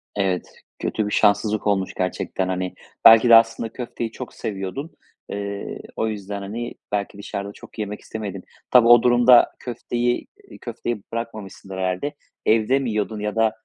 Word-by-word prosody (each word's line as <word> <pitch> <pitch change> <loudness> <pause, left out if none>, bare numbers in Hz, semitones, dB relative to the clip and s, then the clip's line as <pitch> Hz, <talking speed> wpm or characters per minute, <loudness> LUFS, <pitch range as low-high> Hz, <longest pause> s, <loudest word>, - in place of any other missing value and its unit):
Evet, 95 -3 0 0.3
kötü 110 - -1
bir - - -4
şanssızlık 105 +1 +2
olmuş 95 -2 +1
gerçekten, 90 0 -2
hani. 90 0 -2 0.3
Belki 115 +2 +9
de 115 - +10
aslında 115 0 +4
köfteyi 120 -2 -5
çok 130 - -8
seviyordun. 105 - -5 0.4
Eee, 100 0 -5 0.2
o 110 - 0
yüzden, 100 -1 -5
hani, 115 +5 -5 0.2
belki 100 0 -2
dışarıda 100 0 -5
çok - - -14
yemek 105 0 -4
istemedin. 100 -4 -6 0.3
Tabii, 120 -2 +7
o 120 -1 +8
durumda 120 0 +6
köfteyi, 120 0 -2 0.2
eee, - - -12
köfteyi 120 -3 -5
bırakmamışsındır 110 -4 -6
herhâlde. 95 +11 -2 0.3
Evde 115 +5 +3
mi 130 -3 -2
yiyordun 105 0 -2
ya 105 +1 -3
da 110 -1 +3
110 Hz, 155 wpm, -23 LUFS, 100-120 Hz, 0.4 s, de